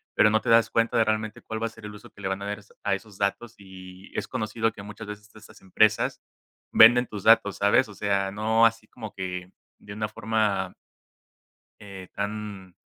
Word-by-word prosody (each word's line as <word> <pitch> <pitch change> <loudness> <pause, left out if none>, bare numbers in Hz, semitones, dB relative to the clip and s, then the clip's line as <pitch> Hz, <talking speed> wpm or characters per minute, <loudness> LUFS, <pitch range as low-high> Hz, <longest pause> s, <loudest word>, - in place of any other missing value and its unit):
pero 105 - +5
no 110 - +2
te 120 - -4
das 115 0 +5
cuenta 115 0 +1
de 115 - +5
realmente 110 0 -2
cuál 110 0 -5
va 115 - 0
a - - -6
ser 110 -1 -14
el 105 - -8
uso 105 - -13
que - - -21
le 95 - -3
van 95 +1 -3
a - - -5
dar 105 0 -3
a - - -14
esos 100 - -24
a 100 - +1
esos 100 0 -11
datos, 110 +4 -2
y 95 0 -13
es - - -2
conocido 110 +1 -1
que 100 - -11
muchas 105 +1 -9
veces 105 0 -9
estas 110 +1 -16
empresas 110 +3 +2 0.5
venden 120 +2 +7
tus 105 -3 -8
datos, 110 -3 +5
¿sabes? 105 +4 +3
O - - -10
sea, 100 -1 0
no 110 +2 +3
así 115 -1 0
como 110 -3 -9
que 90 -1 -6 0.3
de 100 - -10
una 105 0 -3
forma 110 -2 -1 1.1
eh, 95 -3 -10
tan, 100 -3 -5
105 Hz, 215 wpm, -26 LUFS, 100-110 Hz, 1.1 s, venden